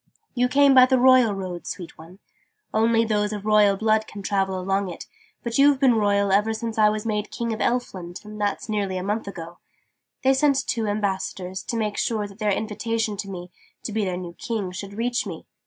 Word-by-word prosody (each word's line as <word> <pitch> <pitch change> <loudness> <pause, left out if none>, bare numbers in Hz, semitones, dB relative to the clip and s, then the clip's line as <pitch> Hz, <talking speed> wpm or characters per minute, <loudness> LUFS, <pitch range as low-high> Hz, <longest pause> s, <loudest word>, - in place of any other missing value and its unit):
"You 250 -1 +2
came 280 +2 +5
by 255 -1 +8
the 260 0 +3
Royal 255 -4 +5
Road, 185 -3 -6
sweet 175 -3 -7
one. 165 +4 -14 0.6
Only 225 +1 +3
those 210 -1 0
of 210 -1 -5
royal 210 -2 +4
blood 220 +1 +1
can 200 -1 -9
travel 195 -1 0
along 195 +1 -1
it: 175 - -8 0.4
but 235 +2 -2
you've 280 -1 +5
been 265 -3 +5
royal 200 -2 +2
ever 210 +3 +3
since 225 0 -4
I 210 0 +6
was 215 +1 -3
made 210 -1 -2
King 230 -1 -3
of 220 - -5
Elfland 185 -8 -2 0.2
that's 205 +2 -2
nearly 200 -3 -1
a 180 - -3
month 210 +2 -2
ago. 170 -3 -8 0.6
They 265 0 +5
sent 270 0 +2
two 225 -3 -1
ambassadors, 190 -2 -2
to 235 - -3
make 215 -2 -2
sure 215 -3 -1
that 200 +1 -15
their 210 -1 +1
invitation 220 +1 -2
to 195 0 -5
me, 180 -1 -8 0.3
to - - -4
be 215 0 0
their 185 -2 -2
new 175 -1 -7
King, 205 -2 -4
should 200 +2 -7
reach 240 +2 -1
me. - - -7
210 Hz, 205 wpm, -24 LUFS, 195-230 Hz, 0.6 s, by